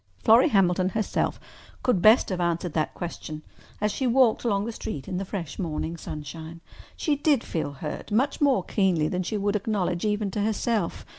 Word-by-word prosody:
Florrie 235 +7 +6
Hamilton 185 -4 +3
herself 215 +2 -1 0.4
could 225 -8 +2
best 220 +5 +6
have 185 -2 -2
answered 170 -1 -1
that 155 - -1
question 155 -3 -6 0.4
as 210 0 +1
she 260 +5 -1
walked 245 -2 +4
along 205 -4 +1
the 230 - -3
street 185 -10 -6
in 185 -2 -3
the 195 - -3
fresh 180 -5 -6
morning 165 -2 -3
sunshine. 160 +1 -8 0.4
She 300 -4 +1
did 285 -3 +2
feel 150 -3 -3
hurt—much 210 - -2
more 270 -10 +3
keenly 180 -7 +1
than 180 +3 -1
she 200 +4 -2
would 205 +1 0
acknowledge 195 -4 -1
even 210 -1 0
to 205 - -2
herself. 215 -2 -1
195 Hz, 175 wpm, -26 LUFS, 170-220 Hz, 0.4 s, Florrie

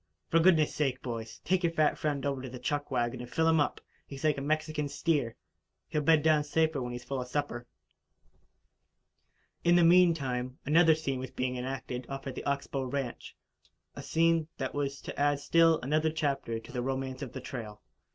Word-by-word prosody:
"For 165 - +5
goodness' 165 -3 +4
sake, 135 -4 -1
boys, 115 -3 -6
take 185 0 +2
your 170 -2 +1
fat 155 -2 +3
friend 145 -2 -2
over 140 -2 -1
to 130 - -6
the 125 - -8
chuck 145 +4 -2
wagon 120 -2 -1
and 120 - -8
fill 160 +4 +1
him 160 -1 +4
up. 145 - 0 0.3
He's 140 +2 -9
like 150 -3 +2
a - - -5
Mexican 155 0 -1
steer 140 -5 0 0.5
he'll 150 - 0
bed 155 0 +4
down 155 -2 +4
safer 160 -1 +1
when 125 0 -4
he's 120 0 -6
full 130 +1 -3
of 125 - -6
supper." 125 -3 -3 2.0
In 175 0 +5
the 175 - +5
meantime, 145 -8 +3
another 160 +1 +5
scene 140 -4 -3
was 130 0 -5
being 125 0 -2
enacted 125 -1 -5
off 135 0 -6
at 135 - -4
the - - -6
Ox 140 0 0
Bow 135 -1 -3
ranch 130 -1 -4 0.6
a - - -6
scene 165 -1 +2
that 130 -1 -3
was 140 -1 -2
to - - -7
add 145 0 +2
still 165 +2 +4
another 155 +5 +1
chapter 140 -7 -1
to 115 - -10
the 125 - -2
romance 130 +1 -3
of 135 - -6
the 130 - -5
trail. 110 -5 -7
140 Hz, 200 wpm, -30 LUFS, 130-155 Hz, 2.0 s, For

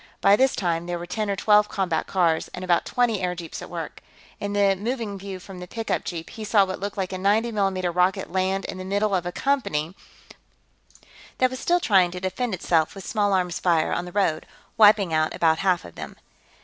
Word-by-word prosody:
By 200 +1 +5
this 265 +4 +2
time, 170 -2 -1
there 175 0 -2
were 170 - -6
ten 210 +4 -3
or 200 - 0
twelve 210 +1 +4
combat 185 -5 -1
cars 170 -4 +1
and 180 - -7
about 175 -1 +2
twenty 235 -5 +1
airjeeps 180 -2 -4
at - - -9
work. - - -6 0.4
In 205 0 -3
the 200 -1 +3
moving 220 0 -3
view 190 -1 -7
from 185 0 -11
the 180 - -8
pickup 225 +4 -3
jeep, 165 -2 -6
he 220 - -8
saw 205 -1 +4
what 185 0 -5
looked 200 +1 -5
like 190 -1 -2
a 185 - -4
90 215 +5 +2
mm 190 -4 -1
rocket 180 +1 +1
land 190 +1 0
in 185 - -6
the - - -5
middle 200 +2 0
of 180 -2 0
a - - -3
company 185 - -1 1.4
that 255 0 +2
was 260 - -5
still 350 +1 +2
trying 190 - +4
to 180 +1 -6
defend 190 +4 -2
itself 165 -2 +1
with 195 - -9
small 210 -2 0
arms 180 -2 0
fire 165 -3 +2
on 175 - -2
the 180 - -8
road, 175 -5 0 0.3
wiping 205 -5 +5
out 155 0 +1
about 160 -1 +2
half 185 -3 +1
of 85 - -11
them. - - -8
190 Hz, 215 wpm, -24 LUFS, 175-205 Hz, 1.4 s, By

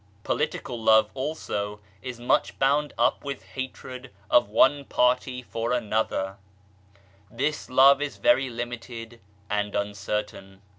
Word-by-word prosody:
Political 120 -2 -2
love 110 -1 +5
also 120 -8 -3 0.2
is 125 -2 -7
much 120 - +1
bound 145 +2 +2
up - - +2
with 140 -2 -5
hatred 130 -1 -7 0.2
of 120 -4 +5
one 140 +6 +4
party 125 -1 +1
for 115 0 -2
another; 105 -4 -1 0.9
this 145 +7 -2
Love 135 +2 +6
is 145 -1 -3
very 220 - +3
limited 120 -1 -7 0.3
and 105 0 -1
un 100 0 -1
certain. 100 -1 -5
120 Hz, 120 wpm, -26 LUFS, 105-130 Hz, 0.9 s, Love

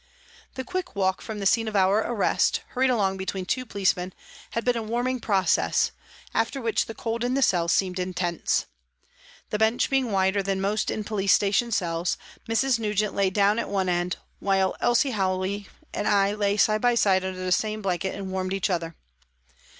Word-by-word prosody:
The 260 - -4
quick 365 +2 -4
walk 190 -1 0
from 220 -2 -6
the 200 - -4
scene 225 +3 +3
of 215 - -4
our 195 +2 +4
arrest, 220 -1 +1
hurried 260 +1 +1
along 195 -6 +1
between 190 0 -4
two 255 +6 -2
policemen, 185 -3 0 0.4
had 230 - -3
been 245 -1 +2
a 230 - -1
warming 240 +3 -1
process, 195 -4 +2 0.4
after 230 +5 0
which 230 -3 0
the 225 - -7
cold 230 0 -3
in 250 +1 0
the 275 - +2
cell 170 -6 +2
seemed 185 +1 +1
intense. 180 -2 -1 0.9
The 210 - -1
bench 220 +4 +2
being 265 -4 +1
wider 190 0 +2
than 195 0 -1
most 205 +2 0
in 215 - -2
police 200 -2 +1
station 205 +4 +2
cells, 175 -3 0 0.3
Mrs. 235 +1 +2
Nugent 210 -1 0
lay 195 -1 +2
down 205 +3 +2
at - - -3
one 190 -2 0
end, 175 0 0 0.2
while 190 -1 +1
Elsie 240 +3 +3
Howey 190 -1 -1 0.3
and 205 - -2
I 200 -1 +3
lay 205 -1 0
side 215 0 +3
by 245 -1 +3
side 190 -4 +3
under 190 -1 -4
the 185 - -1
same 215 +3 0
blanket 190 0 -1
and 195 -1 -6
warmed 185 0 -2
each 195 0 0
other. 165 -2 -2
200 Hz, 190 wpm, -25 LUFS, 190-225 Hz, 0.9 s, our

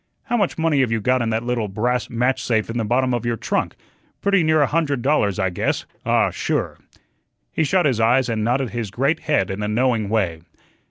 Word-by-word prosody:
"How 240 -3 -2
much 205 -6 0
money 160 -3 +1
have 130 -4 +2
you 115 - +1
got 125 +4 +1
in 115 - 0
that 110 +1 -1
little 120 -3 -1
brass 120 +5 -1
match 125 +3 0
safe 110 -2 0
in 120 - -2
the - - 0
bottom 125 +3 +1
of 120 -2 -1
your 120 -1 -1
trunk? - - -2 0.4
Pretty 200 -2 +2
near 155 -1 +3
a 145 - +5
hundred 145 -5 -1
dollars, 120 -9 +2
I 95 -1 0
guess 90 - -1 0.2
ah, - - +3
sure." - - -2 0.7
He 160 - 0
shut 175 +4 +2
his 130 -6 +1
eyes 120 +3 +3
and 110 -2 -1
nodded 125 +1 0
his 115 -2 -3
great 140 +10 0
head 125 - 0
in 95 +2 -4
a 105 - -1
knowing 115 -1 +1
way. 95 -7 0
120 Hz, 220 wpm, -21 LUFS, 110-140 Hz, 0.7 s, a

